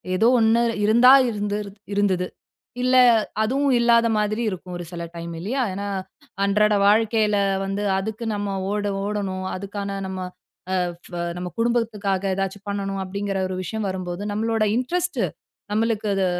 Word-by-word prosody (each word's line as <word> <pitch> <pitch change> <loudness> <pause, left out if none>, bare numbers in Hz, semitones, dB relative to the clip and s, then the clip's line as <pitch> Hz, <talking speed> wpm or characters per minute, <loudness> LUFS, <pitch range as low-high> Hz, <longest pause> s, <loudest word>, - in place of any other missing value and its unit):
ஏதோ 220 +5 +4
ஒண்ணு 225 +1 +4 0.2
இருந்தா 235 +4 +7 0.2
இருந்துருது 205 -1 -3 0.2
இருந்தது. 190 -3 +1 0.5
இல்ல 255 +1 +3 0.5
அதுவும் 275 +5 +1
இல்லாத 235 -1 +4
மாதிரி 210 +2 0
இருக்கும், 180 -2 -7
ஒரு 175 - -6
சில 170 -1 -5
டைம் 170 0 -6
இல்லையா? 240 +10 -2
ஏன்னா 200 +2 -4 0.6
அன்றாட 210 +1 +3
வாழ்க்கையில 215 -1 +3 0.3
வந்து 195 +1 -2 0.2
அதுக்கு 220 +3 -4
நம்ம 205 -1 -2 0.2
ஓட 205 0 -1 0.2
ஓடணும். 195 -3 -3
அதுக்கான 200 +1 -5
நம்ம, 190 0 -5 0.6
"அ - - +2 0.3
ஃப - - -16 0.2
நம்ம 180 0 -4
குடும்பத்துக்காக 220 -5 0
ஏதாச்சு 195 +1 -2
பண்ணணும்." 195 -1 -2
அப்படீங்கிற 200 +1 -3
ஒரு 185 - -3
விஷயம் 220 +2 -3
வரும்போது, 185 -1 -4
நம்மளோட 225 +1 0
இன்ட்ரெஸ்ட்டு, 350 +9 0 0.5
நம்மளுக்கு 220 0 0
அது 195 -1 +1
205 Hz, 140 wpm, -23 LUFS, 195-225 Hz, 0.6 s, இருந்தா